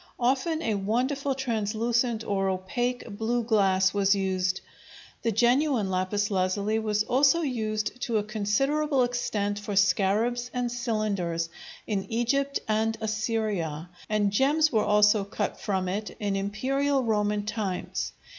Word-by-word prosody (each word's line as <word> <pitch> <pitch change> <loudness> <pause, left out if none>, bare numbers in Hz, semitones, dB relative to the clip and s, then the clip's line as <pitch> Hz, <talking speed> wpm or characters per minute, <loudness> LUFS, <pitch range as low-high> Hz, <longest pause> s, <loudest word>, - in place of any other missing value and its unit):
Often 275 +6 +1
a 225 - 0
wonderful 255 +7 0
translucent 230 -1 0
or 195 -2 0
opaque 240 +7 -2
blue 235 +3 0
glass 195 -4 +3
was 200 0 +3
used. 190 -1 0 0.6
The 230 - 0
genuine 240 -1 +2
lapis 195 +3 0
lazuli 200 +3 0
was 215 -1 0
also 275 +8 +3
used 220 -3 -2
to 230 -3 0
a 210 - 0
considerable 260 +7 +1
extent 210 -4 -1
for 205 0 -5
scarabs 205 +5 +2
and 245 -1 -1
cylinders, 210 -9 -1 0.4
in 200 -3 -2
Egypt 275 +5 0
and 220 +1 +1
Assyria, 215 -7 -2 0.2
and 210 -1 +1
gems 295 +8 +3
were 220 -2 +2
also 210 0 +4
cut 200 - -3
from 190 -3 -1
it 205 +3 -4
in 205 -2 -1
imperial 265 +8 0
Roman 210 -2 0
times. 210 -4 -3
215 Hz, 130 wpm, -27 LUFS, 200-245 Hz, 0.6 s, also